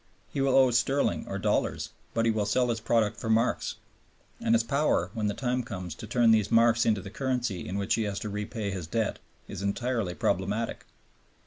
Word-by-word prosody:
He 140 Hz, -, -1 dB
will 135 Hz, -1 st, +3 dB
owe 130 Hz, -2 st, +6 dB
sterling 130 Hz, +4 st, +1 dB
or -, -, -3 dB
dollars, -, -, 0 dB, 0.2 s
but 115 Hz, 0 st, +2 dB
he 115 Hz, -, +4 dB
will 105 Hz, -2 st, -1 dB
sell 125 Hz, +4 st, +2 dB
his 115 Hz, -1 st, 0 dB
product 110 Hz, -2 st, +1 dB
for 115 Hz, -, -5 dB
marks, 115 Hz, +2 st, +1 dB, 0.7 s
and 115 Hz, -, +3 dB
his 115 Hz, -, +3 dB
power, 115 Hz, -, +1 dB
when 110 Hz, -3 st, -1 dB
the 105 Hz, -, -1 dB
time 125 Hz, -1 st, 0 dB
comes, 95 Hz, -8 st, -6 dB
to 110 Hz, -, -9 dB
turn 120 Hz, +1 st, +4 dB
these 110 Hz, -2 st, +3 dB
marks 115 Hz, 0 st, +4 dB
into 105 Hz, -3 st, +2 dB
the 100 Hz, +1 st, -9 dB
currency 125 Hz, -6 st, -2 dB
in 95 Hz, -, -3 dB
which 100 Hz, -1 st, 0 dB
he 115 Hz, -, +1 dB
has 100 Hz, -1 st, -3 dB
to 105 Hz, -, -4 dB
repay 105 Hz, 0 st, -3 dB
his 90 Hz, -4 st, -5 dB
debt 110 Hz, +4 st, -1 dB, 0.3 s
is -, -, -6 dB
entirely 100 Hz, -2 st, -1 dB
problematic. 100 Hz, +4 st, -1 dB
115 Hz, 205 wpm, -28 LUFS, 100-120 Hz, 0.7 s, owe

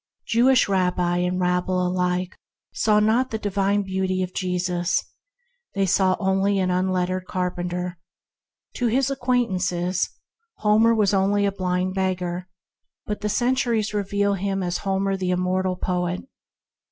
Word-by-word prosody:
Jewish 245 Hz, +2 st, +4 dB
rabbi 180 Hz, -2 st, +1 dB
and 180 Hz, +1 st, 0 dB
rabble 180 Hz, 0 st, +1 dB
alike 180 Hz, 0 st, -1 dB, 0.4 s
saw 210 Hz, -1 st, +3 dB
not 225 Hz, +5 st, +2 dB
the 220 Hz, -, -2 dB
divine 200 Hz, -1 st, 0 dB
beauty 190 Hz, -1 st, -1 dB
of 185 Hz, 0 st, -6 dB
Jesus; 180 Hz, -1 st, -1 dB, 0.7 s
they 195 Hz, -1 st, +2 dB
saw 190 Hz, 0 st, +2 dB
only 195 Hz, +1 st, +1 dB
an 185 Hz, -1 st, +1 dB
unlettered 185 Hz, 0 st, 0 dB
carpenter. 180 Hz, -1 st, -3 dB, 0.8 s
To 245 Hz, -, +1 dB
his 265 Hz, +4 st, +1 dB
acquaint 250 Hz, -3 st, +1 dB
ances, 180 Hz, 0 st, -1 dB, 0.5 s
Homer 220 Hz, -, +3 dB
was 210 Hz, -2 st, +2 dB
only 200 Hz, +1 st, +2 dB
a 200 Hz, -, +1 dB
blind 185 Hz, -1 st, -1 dB
beggar, 180 Hz, -1 st, -2 dB, 0.6 s
but 210 Hz, -1 st, -4 dB
the 210 Hz, -, -1 dB
centuries 240 Hz, -2 st, +1 dB
reveal 200 Hz, 0 st, 0 dB
him 195 Hz, 0 st, -2 dB
as 175 Hz, 0 st, -2 dB
Homer 195 Hz, 0 st, 0 dB
the 185 Hz, -1 st, -2 dB
immortal 185 Hz, +1 st, 0 dB
poet. 180 Hz, 0 st, -2 dB
190 Hz, 135 wpm, -23 LUFS, 180-205 Hz, 0.8 s, Jewish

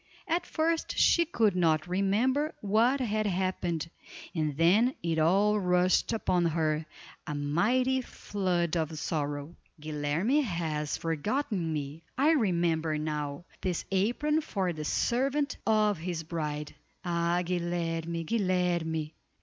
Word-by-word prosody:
At 340 Hz, +2 st, 0 dB
first 325 Hz, +1 st, -1 dB
she 340 Hz, -, +5 dB
could 225 Hz, -, +2 dB
not 160 Hz, -3 st, +2 dB
remember 220 Hz, -, +1 dB
what 225 Hz, +7 st, +3 dB
had 215 Hz, -4 st, 0 dB
happened, 180 Hz, -3 st, -1 dB, 0.5 s
and 155 Hz, -4 st, -1 dB
then 205 Hz, +10 st, +4 dB
it 165 Hz, -1 st, 0 dB
all 200 Hz, +6 st, +3 dB
rushed 180 Hz, +1 st, +2 dB
upon 180 Hz, -6 st, +1 dB
her, 155 Hz, -1 st, 0 dB, 0.4 s
a 150 Hz, -, -3 dB
mighty 230 Hz, -, +1 dB
flood 180 Hz, -8 st, -2 dB
of 160 Hz, -1 st, -1 dB
sorrow. 145 Hz, +1 st, -3 dB, 0.2 s
"Guilerme 155 Hz, -, 0 dB
has 160 Hz, -, -2 dB
forgotten 175 Hz, -, -1 dB
me! 150 Hz, +1 st, -4 dB, 0.2 s
I 290 Hz, +4 st, +4 dB
remember 170 Hz, -, +1 dB
now: 150 Hz, 0 st, -3 dB, 0.2 s
this 180 Hz, -3 st, -2 dB
apron 245 Hz, +11 st, +1 dB
for 190 Hz, -, -2 dB
the 155 Hz, -1 st, -5 dB
servant 275 Hz, -, 0 dB
of 210 Hz, -4 st, +3 dB
his 170 Hz, -1 st, -3 dB
bride. 150 Hz, -2 st, -4 dB, 0.3 s
Ah! 170 Hz, 0 st, +1 dB
Guilerme! 170 Hz, -1 st, -2 dB
Guilerme!" 175 Hz, -6 st, 0 dB
175 Hz, 120 wpm, -29 LUFS, 160-215 Hz, 0.5 s, she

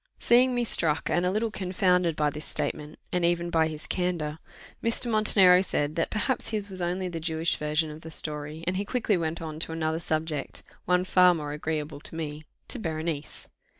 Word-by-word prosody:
Seeing 250 Hz, +1 st, +4 dB
me 245 Hz, -, +1 dB
struck, 160 Hz, -9 st, +1 dB
and 175 Hz, +3 st, +2 dB
a -, -, +3 dB
little 215 Hz, +3 st, 0 dB
confounded, 180 Hz, -3 st, +1 dB
by 150 Hz, -1 st, +1 dB
this 150 Hz, +1 st, -6 dB
statement, 150 Hz, 0 st, -3 dB, 0.2 s
and 180 Hz, -1 st, +1 dB
even 170 Hz, 0 st, +1 dB
by 160 Hz, -1 st, +3 dB
his 155 Hz, -1 st, -6 dB
candour, 170 Hz, -4 st, -2 dB, 0.4 s
Mr. 230 Hz, +2 st, 0 dB
Montenero 195 Hz, -4 st, +6 dB
said, 150 Hz, -5 st, -1 dB
that 165 Hz, -, 0 dB
perhaps 230 Hz, +4 st, -1 dB
his 205 Hz, -2 st, -2 dB
was 185 Hz, -1 st, -7 dB
only 180 Hz, +2 st, -1 dB
the 170 Hz, -2 st, -4 dB
Jewish 160 Hz, 0 st, 0 dB
version 150 Hz, +1 st, 0 dB
of 155 Hz, +1 st, -10 dB
the 160 Hz, -, -9 dB
story, 150 Hz, 0 st, -4 dB
and 185 Hz, +1 st, 0 dB
he 200 Hz, -, 0 dB
quickly 220 Hz, -1 st, 0 dB
went 165 Hz, -1 st, -2 dB
on 155 Hz, -1 st, -6 dB
to 165 Hz, -, -3 dB
another 160 Hz, 0 st, -1 dB
subject, 155 Hz, -3 st, -3 dB, 0.2 s
one 180 Hz, 0 st, +3 dB
far 180 Hz, -1 st, +5 dB
more 150 Hz, -2 st, -4 dB
agreeable 150 Hz, -1 st, -3 dB
to 155 Hz, -, -7 dB
me 155 Hz, -1 st, -5 dB, 0.2 s
to 255 Hz, -, -5 dB
Berenice. 160 Hz, -4 st, -4 dB
165 Hz, 195 wpm, -27 LUFS, 155-185 Hz, 0.4 s, Montenero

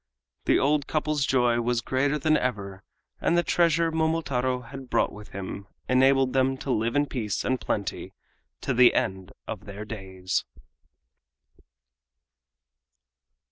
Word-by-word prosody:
The -, -, +4 dB
old 145 Hz, 0 st, +2 dB
couple's 150 Hz, -2 st, 0 dB
joy 120 Hz, -2 st, +3 dB
was 120 Hz, 0 st, +1 dB
greater 135 Hz, +5 st, 0 dB
than 155 Hz, +2 st, +2 dB
ever, 100 Hz, -8 st, -2 dB, 0.4 s
and 170 Hz, -, +2 dB
the 175 Hz, -, +3 dB
treasure 170 Hz, -1 st, +2 dB
Momotaro 140 Hz, -6 st, 0 dB
had 130 Hz, +1 st, -10 dB
brought -, -, +2 dB
home -, -, -13 dB
with 105 Hz, 0 st, -10 dB
him 100 Hz, +1 st, -7 dB, 0.2 s
enabled 135 Hz, 0 st, +4 dB
them 135 Hz, 0 st, +2 dB
to 135 Hz, -, -4 dB
live 115 Hz, +1 st, 0 dB
in 145 Hz, 0 st, +3 dB
peace 115 Hz, -8 st, -3 dB
and 130 Hz, 0 st, 0 dB
plenty 100 Hz, -2 st, -3 dB, 0.5 s
to 135 Hz, -, -1 dB
the 125 Hz, 0 st, +6 dB
end 95 Hz, 0 st, -1 dB, 0.2 s
of -, -, -6 dB
their 100 Hz, +1 st, -7 dB
days. 95 Hz, -4 st, -3 dB
130 Hz, 140 wpm, -26 LUFS, 105-145 Hz, 0.5 s, the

